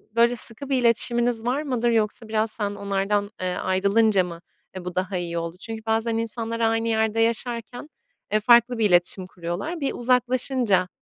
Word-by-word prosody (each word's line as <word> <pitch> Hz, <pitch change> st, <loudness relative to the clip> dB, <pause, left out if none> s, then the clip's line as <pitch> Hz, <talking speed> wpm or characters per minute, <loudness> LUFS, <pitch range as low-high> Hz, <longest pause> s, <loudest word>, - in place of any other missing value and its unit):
böyle, 235 Hz, +1 st, +4 dB
sıkı 235 Hz, +4 st, 0 dB
bir 270 Hz, -, +2 dB
iletişiminiz 235 Hz, 0 st, +2 dB
var 260 Hz, +4 st, 0 dB
mıdır 250 Hz, -5 st, -1 dB
yoksa 220 Hz, 0 st, -1 dB
biraz 220 Hz, 0 st, 0 dB
sen 205 Hz, -2 st, -2 dB
onlardan, 200 Hz, +1 st, -1 dB
eee, 180 Hz, -1 st, -2 dB
ayrılınca 200 Hz, +2 st, +2 dB
mı, 170 Hz, -1 st, -8 dB, 0.3 s
eee, 185 Hz, -1 st, -7 dB
bu 180 Hz, -, -6 dB
daha 185 Hz, 0 st, -2 dB
iyi 170 Hz, -1 st, -4 dB
oldu? 170 Hz, +1 st, -5 dB
Çünkü 225 Hz, -1 st, -7 dB
bazen 225 Hz, +1 st, 0 dB
insanlar 230 Hz, 0 st, -3 dB
aynı 225 Hz, 0 st, +1 dB
yerde 220 Hz, 0 st, 0 dB
yaşarken, 235 Hz, +3 st, 0 dB, 0.4 s
eee, 215 Hz, -, +4 dB
farklı 235 Hz, +2 st, +4 dB
bir 220 Hz, -, +1 dB
iletişim 180 Hz, +1 st, +2 dB
kuruyorlar. 180 Hz, -, -5 dB
Bir 275 Hz, -, -1 dB
uzaklaşınca, 250 Hz, -5 st, +1 dB
225 Hz, 170 wpm, -24 LUFS, 195-235 Hz, 0.4 s, böyle